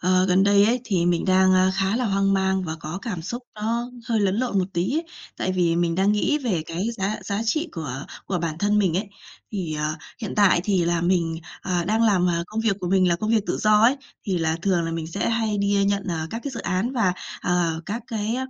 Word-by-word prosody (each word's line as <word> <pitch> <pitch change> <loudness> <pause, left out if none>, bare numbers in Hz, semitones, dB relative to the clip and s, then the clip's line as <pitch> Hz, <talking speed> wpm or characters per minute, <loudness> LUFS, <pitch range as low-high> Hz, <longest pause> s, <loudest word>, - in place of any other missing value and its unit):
ờ, 185 +1 +3
gần 185 +1 +4
đây 200 0 +5
ấy, 240 +3 +2
thì 185 -7 +1
mình, 175 -1 +1
a, 185 - +3
đang 185 0 +5
khá 195 +2 +1
là 250 - 0
hoang 195 -2 +2
mang 190 -1 +1
và 160 -1 -4
có 160 +3 -5
cảm 180 -8 -4
xúc 240 +9 -5
nó 230 +3 -2 0.2
hơi 225 -2 +2
lẫn 195 -1 +1
lộn 240 -4 0
một 185 - +2
tí 170 - 0
ấy, 325 - -1 0.3
tại 185 - -1
vì 175 -2 +2
mình 170 -1 +1
đang 195 +3 +3
nghĩ 255 +8 +1
về 215 - -1
cái 170 +3 -3
giá 195 +2 -1
giá 200 0 -2
trị 310 +9 0
của 145 -4 -5 0.2
của 185 - -1
bản 165 -2 -3
thân 205 +2 +2
mình 185 -5 +2
ấy. 200 +2 -2 0.4
Thì, 180 -7 -3
ờ, 150 0 -1 0.3
hiện 215 - -4
tại 200 -4 +5
thì 190 -4 +2
là 170 0 +1
mình, 170 -2 +1 0.3
ờ, 180 -2 -1
đang 220 +5 +1
làm, 195 -5 +3
ờ, 170 -1 0
công 215 +3 -3
việc 220 -4 +1
của 180 - -2
mình 185 0 +3
là 170 - +2
công 215 +5 -2
việc 225 -1 +4
tự - - -1
do 215 0 +4
ấy, 250 +5 +5 0.3
thì 190 -3 0
là 160 -1 0
thường 185 -3 +2
là 165 - -2
mình 165 -1 -3
sẽ 200 +6 -2
hay 225 -2 0
đi 200 0 +2
nhận, 200 0 +1
ờ, 160 -2 -2
các 230 - -4
cái 280 - -2
dự - - -5
án 185 +8 -1
và, 220 -8 +2 0.3
ờ, 170 -2 0
các 220 +4 -4
cái 220 +1 -2
190 Hz, 255 wpm, -24 LUFS, 175-215 Hz, 0.4 s, đây